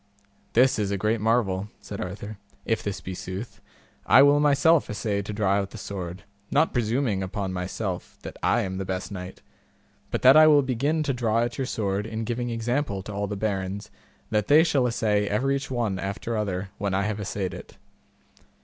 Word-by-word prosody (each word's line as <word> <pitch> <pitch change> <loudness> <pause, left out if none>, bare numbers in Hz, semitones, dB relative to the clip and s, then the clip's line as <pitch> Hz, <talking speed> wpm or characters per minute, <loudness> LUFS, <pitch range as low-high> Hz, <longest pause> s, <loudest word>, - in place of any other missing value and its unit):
This 125 0 +4
is 100 -2 0
a 100 - -1
great 110 +2 0
marvel, 105 -3 +1
said 100 - -7
Arthur, 100 +3 -6 0.3
if 115 - 0
this 100 -2 -4
be 95 - -6
sooth; 95 +5 -7 0.5
I 135 - +8
will 145 +1 +5
myself 150 +2 +4
assay 105 -1 -1
to 100 - -6
draw 105 -2 0
out 100 -1 -1
the 110 - -10
sword, 95 -3 -6 0.3
not 155 +3 +2
presuming 115 -3 0
upon 95 0 -3
myself 90 +1 -4
that - - -7
I - - +2
am 95 -1 -3
the - - -1
best 95 +1 -4
knight, 90 -1 -8 0.7
but - - -3
that 130 +2 +8
I 155 0 +8
will 145 -2 +6
begin 140 +5 0
to 140 -2 0
draw 115 -2 +1
at 120 +2 -4
your 130 - -1
sword 100 -2 -2
in 110 0 -4
giving 120 +2 -2
example 115 -3 -1
to 105 - -7
all 100 0 -2
the 105 - -4
barons 100 -1 -3 0.4
that 105 -2 +1
they 155 +2 +7
shall 140 -7 +2
assay 105 -3 +1
everych 135 +5 0
one 115 -7 -1
after 100 +4 -3
other 100 -2 -2
when 100 -2 -1
I 100 - +1
have 105 0 -2
assayed 100 -2 -3
it. - - -11
105 Hz, 195 wpm, -26 LUFS, 100-125 Hz, 0.7 s, I